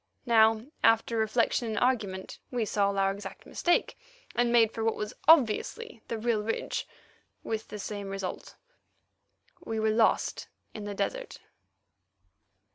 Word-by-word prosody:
Now, 225 -1 +4 0.2
after 225 +1 +4
reflection 230 +2 +1
and 220 - -3
argument, 205 -7 -1
we 240 -3 -1
saw 200 -1 +1
our 195 -1 +1
exact 200 +1 -8
mistake, 350 - 0 0.3
and 240 0 +2
made 230 -2 +5
for 225 - -4
what 225 0 +1
was 210 0 -4
obviously 315 - +3
the 230 - -3
real 225 -1 0
ridge—with 220 0 -5
the 210 - -7
same 205 -1 -5
result. 195 -2 -5 1.1
We 225 -1 -3
were 220 0 +2
lost 220 0 +1 0.3
in 210 -2 -7
the 205 -1 -5
desert! - - -3
220 Hz, 130 wpm, -29 LUFS, 210-235 Hz, 1.1 s, made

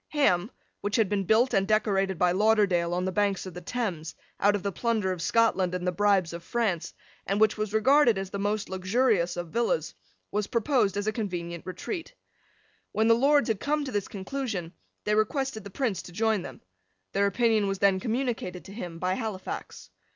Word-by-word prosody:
Ham, 210 - +2 0.3
which 205 0 -2
had 220 -3 +3
been 195 0 -1
built 235 +7 +3
and 195 -2 +2
decorated 195 -3 +1
by 180 +1 +3
Lauderdale, 195 -4 +3
on 180 +1 -1
the 185 - -1
banks 200 0 0
of 185 - -7
the 180 - -8
Thames, 175 -7 -3 0.2
out 205 +1 +4
of 200 - -4
the 200 - -1
plunder 220 -2 0
of 180 -2 -4
Scotland 190 -3 +2
and 180 0 -3
the 180 - +2
bribes 190 -2 +2
of 170 0 -7
France, 205 -6 -1 0.4
and 195 +2 0
which 220 -1 +4
was 215 -1 -3
regarded 235 +1 +4
as 195 0 -4
the 200 - -4
most 205 +1 -1
luxurious 190 -1 +1
of 175 -1 -4
villas, 235 - 0 0.4
was 210 0 -1
proposed 230 -5 +1
as 205 - -1
a 215 - +1
convenient 175 -6 -4
retreat. 330 - -5 0.8
When 220 +1 +2
the - - +8
Lords 280 +4 +4
had 220 -4 0
come 295 0 0
to 260 - -5
this 205 -3 -1
conclusion, 200 -4 -4 0.3
they 210 - 0
requested 220 +2 0
the 200 - -8
Prince 225 -2 -1
to - - -12
join 220 +2 +1
them. 130 -6 -9 0.5
Their 200 0 +2
opinion 220 0 +2
was 195 0 -1
then 195 -1 +3
communicated 225 -5 -2
to 195 - -10
him, 175 -6 -6
by 180 +2 0
Halifax. 210 -3 -5
205 Hz, 195 wpm, -27 LUFS, 185-225 Hz, 0.8 s, the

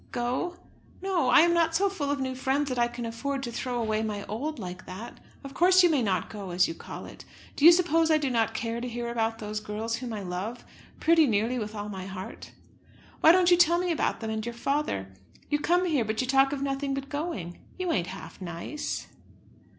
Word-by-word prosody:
"Go? 255 +9 -2 0.5
no! 360 -9 +1
I 255 - +8
am 340 +1 +4
not 330 -1 +2
so 400 +4 +3
full 325 -8 -3
of 285 0 0
new 260 -1 -2
friends 270 +2 0
that 250 -1 -2
I 240 - +4
can 240 0 -6
afford 270 +4 -3
to 240 - -4
throw 245 +1 -3
away 220 -1 0
my 210 -2 -3
old 285 +9 -4
like 180 -4 -7
that. 195 +6 -8 0.2
Of 275 0 -8
course 370 +3 +5
you 350 - +5
may 290 -4 +2
not 190 -6 0
go, 200 -3 -7
as 180 +1 +3
you - - -4
call - - -9
it! - - -11 0.3
Do 290 - +2
you 340 - +12
suppose 330 -2 +3
I 315 - +5
do 285 -4 -1
not 225 -2 +1
care 230 +1 -2
to 250 - -3
hear 240 0 -4
about 225 -1 -1
those 215 -1 -4
girls 215 +2 -3
whom 245 -1 -6
I 210 -2 -4
love, 190 +7 -5 0.3
pretty 325 -2 +5
nearly 230 +3 +1
with 215 0 -5
all 205 0 -4
my 190 -2 -6
heart? 190 0 -8 0.7
Why 320 - +8
don't 360 0 +4
you 350 - +7
tell 345 0 +5
me 360 0 0
about 320 - 0
them, 220 -1 -3
and 220 0 -2
your 235 +1 -4
father? 235 - -2 0.4
You 295 - +2
come 355 +4 +2
here, 300 -8 +2
but 220 0 -3
you 255 - +1
talk 270 +1 +4
of 280 -1 -3
nothing 275 0 -1
but 275 0 -5
going. 280 - -4 0.2
You 365 -2 -1
ain't 180 - 0
half 190 +1 -9
nice." 175 - -4
245 Hz, 230 wpm, -28 LUFS, 215-300 Hz, 0.7 s, you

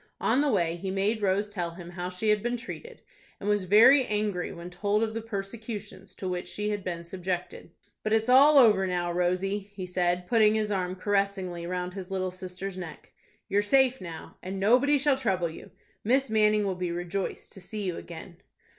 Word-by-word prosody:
On 270 - +2
the 295 - +2
way 170 -5 +1
he 190 +2 -5
made 200 +3 0
Rose 200 +1 +1
tell 175 -4 -4
him 175 -1 -9
how 180 0 -4
she 185 +4 -2
had 210 -1 +3
been 240 +2 -1
treated, 465 - -9 0.4
and 200 - -6
was 205 -2 +1
very 230 +8 +7
angry 210 -4 -1
when 170 +1 -9
told 205 +4 0
of 220 -1 -2
the 225 - -3
persecutions 205 -2 -7
to 190 - -5
which 180 -1 -3
she 210 0 -3
had 205 -2 -3
been 170 -2 -4
subjected. 180 0 -5 0.3
"But 215 - -2
it's 220 +1 +3
all 280 +4 +7
over 210 -7 +6
now, 175 -1 -1
Rosy," 185 +3 0
he 200 -1 -9
said, 180 0 0
putting 220 0 +4
his 215 -1 0
arm 185 -2 -1
caressingly 190 -3 -1
round 180 0 -3
his 190 -1 -7
little 185 -1 -2
sister's 185 +1 -7
neck, 175 -3 -9 0.3
"you're 205 - +2
safe 265 +4 +3
now, 165 -3 -9
and 190 +1 -5
nobody 250 +8 +4
shall 280 -1 +2
trouble 185 -9 0
you. 160 - -11 0.3
Miss 260 +3 +2
Manning 210 -1 +3
will 195 - 0
be 180 -1 -3
rejoiced 175 +2 -4
to 195 - -11
see 210 +3 -6
you 180 -3 -2
again." 170 +1 -10
195 Hz, 200 wpm, -28 LUFS, 180-215 Hz, 0.4 s, very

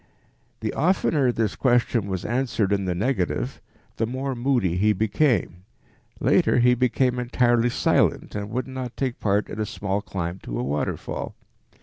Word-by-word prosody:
The - - -2
oftener 155 -5 +2
this 110 -4 -1
question 120 -4 +2
was 95 -2 -3
answered 120 -4 0
in 100 -1 0
the 90 -1 -1
negative, 105 -2 -1 0.4
the 115 - 0
more 130 +3 -3
moody 120 -8 +1
he 105 +4 +3
became; 110 - +1 0.6
later - - +3
he 125 0 +5
became 125 0 +1
entirely 120 -1 +2
silent - - +1
and 105 0 -4
would 125 +3 -2
not 130 -2 -6
take 130 -3 -2
part 100 0 +1
in - - -7
a 110 - 0
small 100 0 -2
climb 95 -3 -4
to - - -6
a - - -1
waterfall. 70 +3 -3
115 Hz, 155 wpm, -24 LUFS, 100-125 Hz, 0.6 s, he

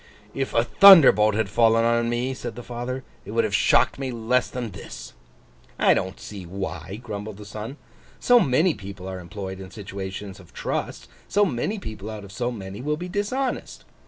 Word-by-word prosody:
'If - - -3
a - - +4
thunderbolt 135 - +8
had 110 -1 +1
fallen 115 +3 +3
on 115 0 +2
me,' 120 +2 -1
said 120 -3 -6
the 120 - -8
father, 125 +2 -5 0.2
'it - - -12
would 115 +2 +1
have 110 -2 -2
shocked 100 - +3
me 135 -1 -3
less 120 +2 0
than 120 -4 -5
this!' 60 -9 -10 0.6
'I - - +5
don't 95 +1 -3
see 100 -3 -8
why,' 95 +1 -6
grumbled 105 -2 -6
the 105 - -10
son. 110 +6 -7 0.4
'So 245 0 +5
many 160 - +3
people 95 -4 -9
are 95 -1 -5
employed 95 +1 -7
in 95 -1 -9
situations 100 -1 -7
of 90 - -17
trust; - - -3 0.2
so 205 +1 +3
many 170 - -2
people, 110 - -7
out 105 -2 -7
of 100 - -11
so 120 +4 -2
many, 100 -2 -7
will 150 +3 -1
be 180 +2 -6
dishonest. 230 +7 -2
110 Hz, 190 wpm, -24 LUFS, 100-125 Hz, 0.6 s, thunderbolt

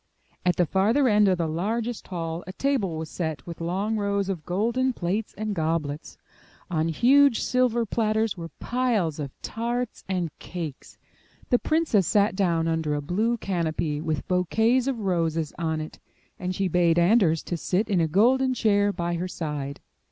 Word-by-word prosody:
At 180 -1 +2
the 180 - +3
farther 215 - +2
end 210 -2 +4
of 185 -2 +3
the 170 - 0
largest 220 +8 -2
hall 165 -2 -4
a 185 - -6
table 215 - 0
was 160 0 -4
set 160 -2 -4
with 170 -1 -8
long 195 +6 -1
rows 200 -1 0
of 175 -6 -4
golden 235 +8 +1
plates 200 +3 -2
and 215 -1 -2
goblets. 160 -3 -2 0.5
On 160 -1 +1
huge 260 - +4
silver 245 -2 +1
platters 220 0 0
were 165 -2 -7
piles 230 - 0
of 140 -2 -4
tarts 240 +1 -3
and 180 -5 -2
cakes. 165 -6 -7 0.5
The 245 - +5
princess 310 - +2
sat 205 -2 +3
down 170 -4 +1
under 160 -2 0
a - - -1
blue 215 +10 0
canopy 160 -6 -2
with 155 -3 -2
bouquets 220 +8 +2
of 255 -5 -1
roses 165 -5 0
on 160 -1 -1
it; 155 - -7 0.4
and 180 0 -3
she 195 0 0
bade 175 -1 +3
Anders 175 -3 +4
to 175 - -3
sit 185 +5 0
in 195 -5 +2
a 160 - +2
golden 255 +9 +3
chair 205 -3 +3
by 175 -2 -2
her 180 +2 -2
side. 150 -5 -5
185 Hz, 170 wpm, -25 LUFS, 165-225 Hz, 0.5 s, The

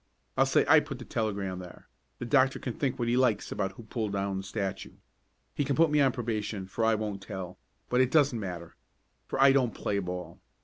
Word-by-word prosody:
I'll 135 - +4
say 135 - +3
I 155 +2 +8
put 145 -3 -6
the 120 - -9
telegram 100 -5 -2
there. 90 -1 -11 0.3
The - - -5
doctor 135 +1 +3
can 125 - -4
think 135 0 -1
what 120 - -1
he 120 - +2
likes 125 -5 +2
about 95 0 -2
who 115 - -11
pulled 110 -2 -3
down 100 -1 -1
the - - -3
statue. 95 0 -4 0.6
He - - 0
can 140 0 0
put 165 -1 +4
me 150 -1 +4
on 135 -2 +4
probation 110 -5 -3
for 95 +4 -3
I 110 0 +4
won't 105 -2 -4
tell, 95 -3 -7 0.3
but 125 +1 +3
it 130 - +3
doesn't 140 -5 +3
matter, 90 -4 -6 0.5
for - - -3
I 135 0 +7
don't 130 -4 +2
play 100 - -1
ball. 90 -2 -6
110 Hz, 220 wpm, -29 LUFS, 95-130 Hz, 0.6 s, I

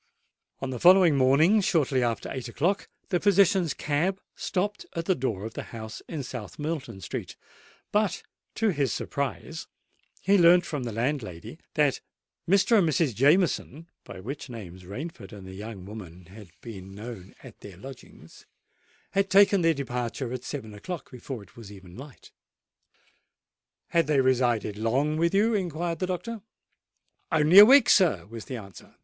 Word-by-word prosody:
On 135 -1 -3
the 125 - -5
following 180 -2 +6
morning, 145 +11 +4
shortly 150 -9 +1
after 120 -2 -1
eight 130 -1 -5
o'clock, 175 +12 -1 0.2
the 180 -3 +1
physician's 195 -4 +3
cab 170 +7 -1 0.2
stopped 205 +2 -2
at 165 0 -3
the 190 - +3
door 115 - -3
of 110 - -7
the - - -5
house 110 -1 -8
in 155 -4 -5
South 125 -4 -8
Moulton 145 -10 -5
Street; - - -6 0.6
but, 205 -4 0 0.3
to 225 0 +1
his 140 - 0
surprise, 140 -2 -4 0.5
he 200 +1 +3
learnt 175 +1 +6
from 145 -5 -4
the 120 - -4
landlady 115 - -4 0.2
that - - +2 0.5
Mr. 200 +4 +4
and 170 -4 +2
Mrs. 150 -3 +1
Jameson 155 - +1
(by - - -10
which 130 +7 -7
names 95 -6 -9
Rainford 110 - -8
and 100 -3 -10
the 95 - -10
young 100 -1 -8
woman 90 -4 -10
had 100 +1 -13
been 95 -4 -10
known 105 -3 -9
at - - -13
their 100 -4 -12
lodgings) 135 +6 -13 0.6
had 195 0 +1
taken 200 -1 +5
their 165 -1 +3
departure 125 -1 -4
at 125 -1 -5
seven 125 -8 -6
o'clock, 165 - -7
before 125 -2 -7
it 95 - -21
was 110 -4 -11
even 95 -3 -13
light. 135 +2 -12 1.6
"Had 165 -3 +2
they 150 -2 +2
resided 120 -5 +1
long 135 +7 0
with 170 +3 +1
you?" 220 +3 +3
inquired 175 -4 -2
the 185 - -1
doctor. 215 +5 -4 0.9
"Only 160 +5 +6
a 205 - +12
week, 270 +2 +7
sir," 155 - +4
was 115 +2 -9
the 130 - -5
answer. 100 -4 -13
135 Hz, 160 wpm, -27 LUFS, 110-175 Hz, 1.6 s, a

